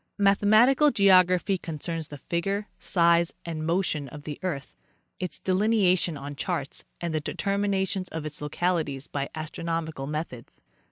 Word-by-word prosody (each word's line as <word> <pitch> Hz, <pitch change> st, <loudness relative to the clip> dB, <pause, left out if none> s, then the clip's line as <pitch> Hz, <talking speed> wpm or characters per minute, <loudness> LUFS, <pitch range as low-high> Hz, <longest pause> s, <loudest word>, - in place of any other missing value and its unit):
3 205 Hz, -, -1 dB
Mathematical 215 Hz, +9 st, +5 dB
geography 185 Hz, -3 st, +4 dB
concerns 165 Hz, -1 st, -4 dB
the 145 Hz, -, -8 dB
figure, 195 Hz, +7 st, -2 dB
size 170 Hz, -1 st, +3 dB
and 160 Hz, -2 st, -4 dB
motion 165 Hz, -5 st, 0 dB
of 145 Hz, +2 st, -10 dB
the 150 Hz, -1 st, -6 dB
earth, 155 Hz, -8 st, -4 dB, 0.5 s
its 180 Hz, -4 st, -4 dB
delineation 185 Hz, -4 st, +2 dB
on 145 Hz, +1 st, -7 dB
charts, 140 Hz, 0 st, -3 dB
and 170 Hz, -2 st, -3 dB
the 155 Hz, -, 0 dB
determinations 195 Hz, +1 st, -1 dB
of 160 Hz, -1 st, -5 dB
its 150 Hz, -1 st, -4 dB
localities 150 Hz, -3 st, -1 dB
by 140 Hz, -1 st, -3 dB
astronomical 160 Hz, -2 st, -4 dB
methods. 150 Hz, -5 st, -6 dB
170 Hz, 135 wpm, -27 LUFS, 150-190 Hz, 0.5 s, Mathematical